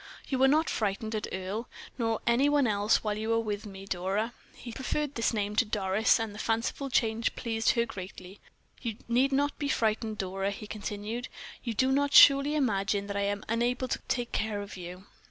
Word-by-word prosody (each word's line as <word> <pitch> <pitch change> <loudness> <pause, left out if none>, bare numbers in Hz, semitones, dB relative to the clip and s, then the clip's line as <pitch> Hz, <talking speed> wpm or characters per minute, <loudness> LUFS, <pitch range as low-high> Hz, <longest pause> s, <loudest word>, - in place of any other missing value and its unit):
"You 260 -2 0
are 265 - +7
not 310 +4 +3
frightened 215 +1 -2
at 215 -1 -2
Earle, 190 +5 -4 0.3
nor 225 -2 -1
any 240 +5 +4
one 290 -2 +3
else, 210 -1 +2
while 210 -1 -1
you 220 +1 -2
are 230 - +3
with 210 -1 -3
me, 195 -1 -9
Dora?" 195 +5 -1 0.2
He 240 - -9
preferred 280 +4 -2
this 230 -3 +1
name 210 -2 -2
to - - +6
Doris, 210 0 +2
and 225 -2 -3
the 210 - -9
fanciful 230 +5 -1
change 225 -2 +1
pleased 225 -2 +1
her 235 -1 +1
greatly. 190 -2 -9 0.4
"You 230 -4 -4
need 250 +4 +3
not 285 +1 0
be 290 - -1
frightened, 220 -2 0
Dora," 195 0 -2
He 200 +1 -6
continued. 210 +3 -5 0.4
"You 235 -3 -3
do 260 +4 +2
not 285 +1 +2
surely 280 +2 +8
imagine 200 -7 +1
that 200 0 -5
I 200 - 0
am 200 0 -2
unable 240 +3 0
to - - -1
take 240 -1 -1
care 210 -2 -1
of 200 - -9
you?" 180 +1 -9
225 Hz, 200 wpm, -29 LUFS, 205-245 Hz, 0.4 s, surely